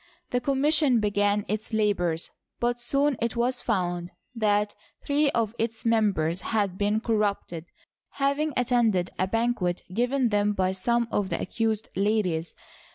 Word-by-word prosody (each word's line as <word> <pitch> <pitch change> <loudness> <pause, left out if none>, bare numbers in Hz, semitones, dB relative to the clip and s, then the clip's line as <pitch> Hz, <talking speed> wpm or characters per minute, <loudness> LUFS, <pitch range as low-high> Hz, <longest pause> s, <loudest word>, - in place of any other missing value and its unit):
The 245 - +1
commission 275 0 +3
began 205 0 +1
its 215 +2 -3
labors, 180 -6 0 0.3
but 240 0 0
soon 275 +3 +1
it 235 +1 -1
was 245 +1 +1
found 175 -5 -1 0.2
that 210 -2 +1 0.3
three 290 +1 +2
of 230 -5 0
its 225 0 -2
members 195 -7 +1
had 205 -4 0
been 210 +2 0
corrupted, 205 -7 -1 0.5
having 285 +2 0
attended 235 -7 +2
a 185 - +2
banquet 225 -5 0
given 245 +3 +1
them 205 0 +2
by 185 -2 +1
some 235 +5 0
of 200 -2 0
the - - -1
accused 220 -1 -1
ladies. 190 -5 0
220 Hz, 140 wpm, -26 LUFS, 200-240 Hz, 0.5 s, commission